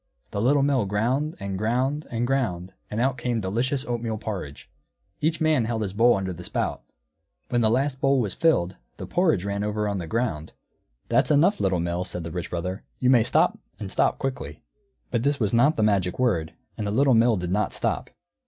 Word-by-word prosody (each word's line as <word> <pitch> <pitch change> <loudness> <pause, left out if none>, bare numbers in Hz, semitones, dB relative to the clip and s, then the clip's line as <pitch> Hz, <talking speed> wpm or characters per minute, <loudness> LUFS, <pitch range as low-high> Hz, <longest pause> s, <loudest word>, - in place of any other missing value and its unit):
The 100 - -2
Little 135 +4 +3
Mill 135 -7 +2
ground, 125 +10 0
and 100 -1 -4
ground, 130 +7 0
and 120 0 -1
ground, 95 -9 -1 0.2
and 105 - -3
out 130 0 +1
came 120 -1 -1
delicious 120 +8 -1
oatmeal 115 -2 -2
porridge. 95 -10 -6 0.5
Each 160 +2 0
man 155 -7 +2
held 110 -1 -1
his 95 -2 -4
bowl 115 +2 +4
under 95 -1 -3
the 90 +1 -9
spout. - - -2 0.7
When 120 - +1
the 110 - +4
last 130 +3 0
bowl 135 0 +3
was 105 -6 0
filled, 95 - +1 0.2
the - - -6
porridge 160 - +1
ran 100 0 -2
over 105 0 -1
on 100 -2 -2
the 85 - -5
ground. 100 -8 -2 0.6
"That's - - +3
enough, 165 +8 +4
Little 95 -2 +1
Mill," 85 +1 -1
said 90 -1 -6
the 85 - -6
Rich 90 +1 -4
Brother. 90 +3 -3 0.2
"You 125 0 +3
may 125 -3 +6
stop, 120 - +2 0.2
and - - -6
stop - - +2
quickly." 80 - -5 0.5
But 115 - +1
this 140 +2 +1
was 105 -3 0
not 140 +7 +4
the 110 - +1
magic 95 -4 +1
word, 90 -11 0 0.3
and 105 - -2
the - - -1
Little 135 +4 +4
Mill 115 -1 +4
did 90 -1 -3
not 105 +3 +1
stop. - - -2
115 Hz, 205 wpm, -25 LUFS, 95-130 Hz, 0.7 s, may